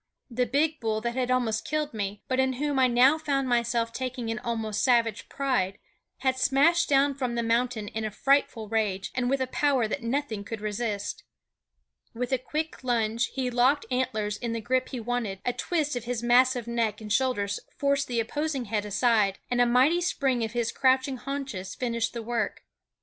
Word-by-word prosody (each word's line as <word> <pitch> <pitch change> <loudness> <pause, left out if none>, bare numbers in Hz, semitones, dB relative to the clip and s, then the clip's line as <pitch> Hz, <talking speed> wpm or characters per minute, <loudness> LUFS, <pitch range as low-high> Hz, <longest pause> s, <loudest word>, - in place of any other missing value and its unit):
The 250 +1 0
big 300 +5 +1
bull 220 -2 -1
that 235 +1 -2
had 255 0 -1
almost 240 -4 +1
killed 300 0 -2
me, 205 -1 -4
but 260 0 0
in 265 0 +2
whom 285 +1 -1
I 260 - +5
now 255 +5 +5
found 275 -3 0
myself 235 -1 +1
taking 255 -2 -3
an 225 - -3
almost 225 -3 -2
savage 235 -4 +2
pride, 245 -9 0 0.4
had 260 -1 +1
smashed 280 +8 +3
down 280 0 +4
from 255 -3 -3
the 235 - 0
mountain 230 -1 0
in 220 - -4
a 215 - -1
frightful 250 -1 +1
rage, 205 -3 -1
and 250 -1 0
with 275 +1 +1
a - - +2
power 260 -2 +1
that 215 - -3
nothing 235 -3 -2
could 220 +2 -6
resist. 210 -1 -3 0.9
With 245 +2 -3
a 260 - +2
quick 310 +3 -4
lunge 230 -2 +1
he 255 -2 -3
locked 255 +4 +3
antlers 220 -5 -1
in 235 0 -3
the 230 - -2
grip 255 +3 0
he 255 - -5
wanted; 230 -4 -2
a 245 - +1
twist 305 -3 -1
of 245 -1 -4
his 240 -1 -3
massive 245 0 +4
neck 230 -3 -1
and 210 -1 -3
shoulders 205 -7 0 0.2
forced 280 0 +1
the 240 -2 -1
opposing 280 +3 -2
head 210 -1 -2
aside, 210 -2 +2
and 245 0 +3
a 245 - +5
mighty 265 +9 +4
spring 270 -8 0
of 220 0 -3
his 235 -2 0
crouching 260 0 +2
haunches 265 -9 -5
finished 235 -2 -1
the 235 -1 -5
work. 235 +1 -2
245 Hz, 195 wpm, -27 LUFS, 225-265 Hz, 0.9 s, I